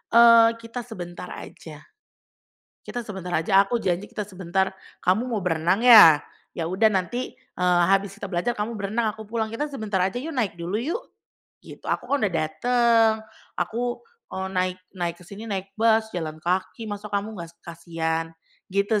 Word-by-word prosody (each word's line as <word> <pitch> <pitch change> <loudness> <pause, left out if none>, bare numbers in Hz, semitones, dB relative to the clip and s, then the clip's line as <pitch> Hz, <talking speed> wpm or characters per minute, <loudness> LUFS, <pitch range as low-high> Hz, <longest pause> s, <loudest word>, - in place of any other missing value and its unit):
eee, 230 -1 +8
"Kita 230 +2 -7
sebentar 180 -5 -8
aja, 155 -2 -10 1.0
kita 245 -1 -5
sebentar 190 -4 -7
aja, 195 +5 +4
aku 200 +4 -1
janji 185 -1 -1
kita 210 - -4
sebentar, 190 0 -1 0.3
kamu 215 +8 +2
mau 220 - 0
berenang 175 +6 +1
ya? 210 -11 +10 0.4
Ya 165 - -2
udah 195 +5 +3
nanti, 195 +6 -2
eee, 180 -8 +1
habis 195 0 +2
kita 200 - -6
belajar 180 +8 0
kamu 215 +3 -3
berenang 215 +2 0
aku 220 -2 -11
pulang 220 -1 -2
kita 295 +6 -2
sebentar 215 -8 -2
aja 190 +5 -1
yuk, 310 +6 -5
naik 220 -10 -1
dulu 180 +6 -2
yuk." 340 - -2 0.6
Gitu, - - -13
"Aku, - - -1
kan, 285 0 +1
udah 200 - +2
dateng, 230 +8 +3 0.5
aku, 240 +2 -2 0.3
eee, 190 0 -4
naik 185 0 0 0.2
naik 175 -2 -3
ke 180 - -15
sini 210 +5 -9
naik 195 0 -4
bus, 220 0 +3
jalan 155 -3 -4
kaki, 185 +7 -2
masa 205 0 -6
kamu 205 +2 -2
nggas 170 0 -9
kasihan," 165 -1 -3 0.4
gitu, 200 +2 +1
200 Hz, 165 wpm, -24 LUFS, 180-230 Hz, 1.0 s, ya